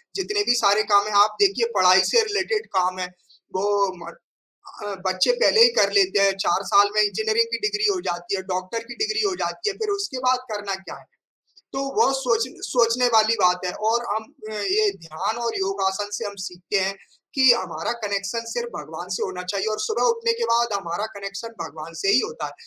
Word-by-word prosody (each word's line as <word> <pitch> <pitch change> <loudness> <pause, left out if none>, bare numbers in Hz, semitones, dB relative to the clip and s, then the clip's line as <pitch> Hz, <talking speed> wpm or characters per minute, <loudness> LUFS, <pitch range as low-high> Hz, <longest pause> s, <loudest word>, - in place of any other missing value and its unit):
जितने 410 +1 -1
भी 245 - +5
सारे 205 +2 +4
काम 200 +1 +5
हैं 215 - -4
आप 215 - -1
देखिए 405 +3 +3
पढ़ाई - - +6
से 470 - +6
रिलेटेड 425 +1 -1
काम 185 0 +1
हैं 180 0 -5 0.4
वो 190 +2 0 0.4
म 170 - -8 0.7
अ, 205 -1 -4
बच्चे 185 - +2
पहले 450 - +5
ही 475 - +9
कर - - +4
लेते 385 - +3
हैं, 195 0 +4
4 190 +3 +1
साल 205 0 +6
में - - +5
इंजीनियरिंग 440 - +1
की - - 0
डिग्री 420 0 -2
हो 380 -2 -1
जाती 175 +2 -3
है 190 - -5
डॉक्टर 185 +5 -3
की - - -6
डिग्री 430 0 -1
हो 380 - -2
जाती 420 - -2
है 400 - -7
फिर 440 -2 -3
उसके 395 -10 -4
बाद 255 0 +3
करना 205 -2 -3
क्या - - -9
है? - - -19 0.7
तो 270 - -3 0.2
वो 425 -11 +4
सोच 235 -3 +1 0.2
सोचने 245 0 +2
वाली 220 0 +5
बात 180 0 +2
है 180 - -2 0.2
और 235 +1 +1
हम 220 0 -3 0.3
अ, - - -7
ये 390 - +1 0.2
ध्यान 165 +8 -3
और 230 - -2
योगासन 195 +1 -1
से - - -4
हम 200 0 -7
सीखते 180 +2 -3
हैं 195 - -2 0.4
कि 265 -2 +6
हमारा 235 - -2
कनेक्शन 200 +2 -2
सिर्फ़ 475 0 -3
भगवान - - -8
से - - -4
होना 180 - -4
चाहिए 200 +1 -2
और - - -7
सुबह 440 - -1
उठने 460 0 0
के - - +1
बाद 235 -1 +2
हमारा 185 +2 -4
कनेक्शन 200 +3 -6
भगवान 160 0 -9
से 195 - 0
ही 250 - +5
होता 475 +1 -6
है। - - -9
220 Hz, 210 wpm, -23 LUFS, -, 0.7 s, ही